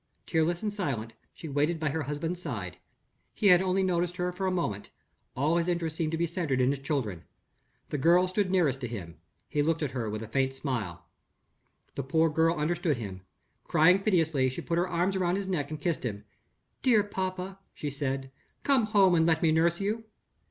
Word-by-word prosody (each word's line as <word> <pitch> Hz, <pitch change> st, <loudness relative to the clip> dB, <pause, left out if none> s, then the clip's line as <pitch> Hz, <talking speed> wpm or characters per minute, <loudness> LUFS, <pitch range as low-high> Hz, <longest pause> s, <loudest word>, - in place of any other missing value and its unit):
Tearless 170 Hz, +2 st, 0 dB
and 210 Hz, -1 st, -1 dB
silent, 130 Hz, -, -3 dB, 0.2 s
she 165 Hz, -, -9 dB
waited 150 Hz, +3 st, 0 dB
by 155 Hz, -1 st, 0 dB
her 160 Hz, +3 st, -2 dB
husband's 155 Hz, +5 st, -3 dB
side. -, -, -5 dB, 0.6 s
He 215 Hz, -, -3 dB
had 180 Hz, -1 st, +7 dB
only 190 Hz, 0 st, +1 dB
noticed 180 Hz, -1 st, 0 dB
her 180 Hz, 0 st, -1 dB
for 190 Hz, +2 st, -2 dB
a -, -, +1 dB
moment. 110 Hz, -, -2 dB, 0.5 s
All 150 Hz, +6 st, +2 dB
his 170 Hz, 0 st, 0 dB
interest 170 Hz, -3 st, -1 dB
seemed 160 Hz, -1 st, -1 dB
to 165 Hz, -, -1 dB
be 170 Hz, -, +1 dB
centered 165 Hz, -6 st, -1 dB
in 130 Hz, +1 st, +3 dB
his 140 Hz, -, -3 dB
children. 135 Hz, -, -2 dB, 0.7 s
The 145 Hz, -, -2 dB
girl 175 Hz, +5 st, +5 dB
stood 185 Hz, +1 st, 0 dB
nearest 155 Hz, -8 st, +2 dB
to 125 Hz, -, -2 dB
him, 85 Hz, -9 st, -7 dB, 0.3 s
he 150 Hz, -, 0 dB
looked 160 Hz, +1 st, +1 dB
at 140 Hz, -, -2 dB
her 120 Hz, -5 st, -3 dB
with 110 Hz, +1 st, -4 dB
a -, -, -7 dB
faint 135 Hz, +3 st, 0 dB
smile. 120 Hz, -, -4 dB, 0.9 s
The -, -, -3 dB
poor 160 Hz, +4 st, +2 dB
child 165 Hz, +2 st, +3 dB
understood 155 Hz, -1 st, 0 dB
him. 95 Hz, -5 st, -6 dB, 0.4 s
Crying 180 Hz, +5 st, +5 dB
piteously, 160 Hz, -10 st, +2 dB
she 130 Hz, -, -5 dB
put 170 Hz, 0 st, -1 dB
her 180 Hz, +1 st, 0 dB
arms 180 Hz, +3 st, +1 dB
around 180 Hz, -1 st, +1 dB
his 200 Hz, 0 st, -2 dB
neck 180 Hz, -7 st, -2 dB
and 155 Hz, -1 st, -5 dB
kissed 155 Hz, -3 st, -1 dB
him. 105 Hz, -4 st, -4 dB, 0.6 s
"Dear 230 Hz, -6 st, +4 dB
papa," 190 Hz, -1 st, -4 dB, 0.2 s
she 145 Hz, -, -4 dB
said; 135 Hz, -1 st, -3 dB, 0.3 s
"come 265 Hz, -6 st, +3 dB
home 200 Hz, -4 st, +5 dB
and 165 Hz, -1 st, +4 dB
let 160 Hz, 0 st, +2 dB
me 160 Hz, -, +4 dB
nurse 170 Hz, +2 st, +2 dB
you." 215 Hz, +3 st, -2 dB
160 Hz, 200 wpm, -29 LUFS, 135-180 Hz, 0.9 s, had